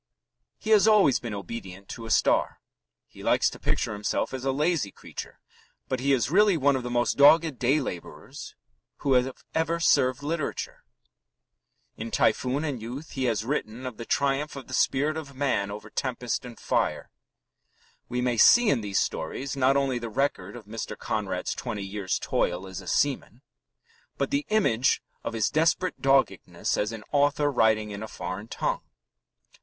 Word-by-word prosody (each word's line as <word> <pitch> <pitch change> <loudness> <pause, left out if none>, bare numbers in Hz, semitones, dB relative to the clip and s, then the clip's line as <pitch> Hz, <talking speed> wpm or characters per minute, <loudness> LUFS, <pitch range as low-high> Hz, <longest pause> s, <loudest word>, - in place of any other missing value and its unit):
He 220 - -4
has 215 0 +6
always 205 - +5
been 115 -3 -5
obedient 100 -1 -7
to 115 -1 -7
a - - -8
star. - - +2 0.5
He - - -14
likes - - +2
to - - -10
picture - - -1
himself 105 +4 -2
as 130 -1 -4
a 135 - +1
lazy 150 - 0
creature, - - -9 0.5
but 130 - -2
he 140 +2 +1
is 125 -1 +2
really 200 0 +5
one 140 -1 +3
of 130 - -1
the 125 - -5
most 120 0 +1
dogged 150 -1 +6
day 130 +5 +3
labourers 90 - -7 0.5
who 135 - +4
have 125 +1 +3 0.2
ever 165 +1 0
served 130 -5 +3
literature. 155 0 -3 1.1
In 115 +1 -5
Typhoon 130 +5 +1
and 140 -7 -3
Youth 130 +7 -7
he 130 -2 -2
has 115 -2 0
written 125 -2 -3
of 125 -4 -6
the 115 - -6
triumph 140 +3 0
of 140 - -8
the 130 - -9
spirit 145 +4 +1
of 140 -4 -7
man 130 -8 0
over 105 +1 -7
tempest 125 -2 -2
and 120 -2 -10
fire. - - -1 1.0
We 125 0 -1
may 125 -1 0
see 240 - +7
in 120 - +1
these 100 -3 0
stories 130 - -3
not 135 0 +3
only 135 -3 0
the 115 -1 -5
record 110 -5 -1
of 120 -4 -10
Mr. 110 +2 -6
Conrad's - - -2
twenty 105 -2 -5
years' 95 -1 -2
toil 90 +2 -1
as 95 0 -7
a 95 - -13
seaman, 135 +3 0 0.7
but - - -1
the 285 +1 0
image 135 - +2 0.2
of - - -4
his 110 -2 0
desperate 165 +4 +1
doggedness 135 0 +1
as 105 +1 -1
an 110 -2 -7
author 145 0 +2
writing 110 -4 +2
in 100 0 -6
a 110 - -5
foreign 95 +3 -6
tongue. - - -2
130 Hz, 175 wpm, -27 LUFS, 110-145 Hz, 1.1 s, see